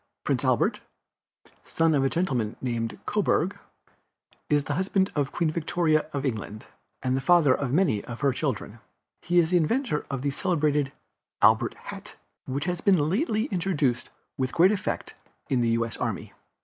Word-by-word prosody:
Prince - - 0
Albert, - - +1 0.6
the - - -25 0.2
son 165 -1 +2
of 140 -2 +2
a 135 - +2
gentleman 125 - -1
named 115 -3 -3
Coburg, - - 0 0.9
is 145 -1 +3
the 145 - -3
husband 190 +3 +1
of 145 -2 -1
Queen 165 -3 0
Victoria 155 -1 +1
of 140 -1 -3
England, 110 -3 -4 0.4
and 130 0 +1
the 135 - -1
father 155 -2 +5
of 135 -1 -2
many 140 - +2
of 120 -1 -8
her 140 -2 +3
children. 120 -6 -3 0.4
He 175 +1 0
is 170 -1 +4
the 180 - +5
inventor 175 - 0
of 135 -2 -3
the 140 - 0
celebrated 150 -3 0 0.5
"Albert - - +4
hat," - - -10 0.3
which 140 +3 -3
has 180 -1 -2
been 170 -7 +3
lately 220 - +1
introduced 155 -10 0 0.3
with 130 -1 -1
great 180 +4 +5
effect 205 - -3 0.4
in 130 -2 +2
the 115 - +2
U. 115 0 +1
S. 115 - -4
Army. - - -4
145 Hz, 170 wpm, -26 LUFS, 130-175 Hz, 0.9 s, father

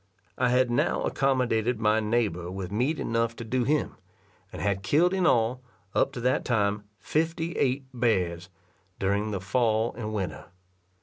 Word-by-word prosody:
I 125 -1 +1
had 125 0 +3
now 150 +8 +1
accommodated 125 -4 +1
my 110 0 +3
neighbour 105 -6 0
with 95 0 -5
meat 130 +9 0
enough 115 0 0
to 115 - -7
do 120 +2 0
him, 150 +3 0 0.5
and - - -8
had 100 0 0
killed 160 - +3
in 185 -2 +2
all, 120 0 +2 0.3
up - - +2
to 120 - -5
that 125 +2 +1
time, 105 -3 0
fifty 165 +4 -1
eight 135 -3 0
bears, 90 -8 0 0.5
during 100 +2 0
the 100 -2 -2
fall 110 +3 +1
and 110 -3 -4
winter. 95 -7 -4
115 Hz, 160 wpm, -27 LUFS, 105-130 Hz, 0.5 s, had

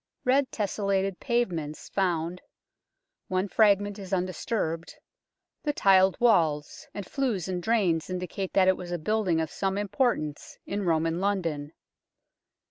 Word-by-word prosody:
Red 265 +1 +3
tesselated 195 -2 -1
pavements 180 - -2
found 175 -2 -1 0.9
one 185 0 0
fragment 205 0 +3
is 190 -1 -8
undisturbed 180 -2 -2 0.7
the 295 - -1
tiled 190 -5 +4
walls, 160 -11 +2
and 205 - -6
flues 225 - -1
and 180 -1 -2
drains 180 -7 +1
indicate 185 +1 -4
that 190 -1 +4
it 185 - +4
was 175 -1 -7
a 175 - -1
building 185 -1 +1
of 160 -1 -2
some 195 0 -1
import 235 +5 +1
ance 150 -1 -7
in 200 0 -3
Roman 165 0 +1
London. 170 -7 -1
190 Hz, 130 wpm, -27 LUFS, 170-205 Hz, 0.9 s, tiled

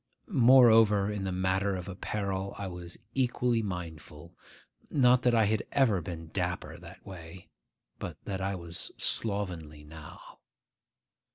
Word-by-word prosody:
Moreover, 115 - +6
in 100 -2 -3
the 95 - -2
matter 95 +2 0
of 90 0 -6
apparel 100 0 -3
I 100 - -4
was 90 -1 -8 0.2
equally 125 -2 +1
mindful; 85 -4 -7 0.5
not 125 -2 +4
that 120 -1 +3
I 110 -2 +4
had 110 +1 +1
ever 115 -10 +3
been 80 -1 -7
dapper 85 -3 -3
that 85 +2 -13
way; 90 -2 -11 0.5
but - - -6
that 95 -1 -4
I 95 +1 -1
was 85 -1 -7
slovenly 90 -8 -2
now. 75 0 -12
95 Hz, 130 wpm, -29 LUFS, 85-110 Hz, 0.5 s, Moreover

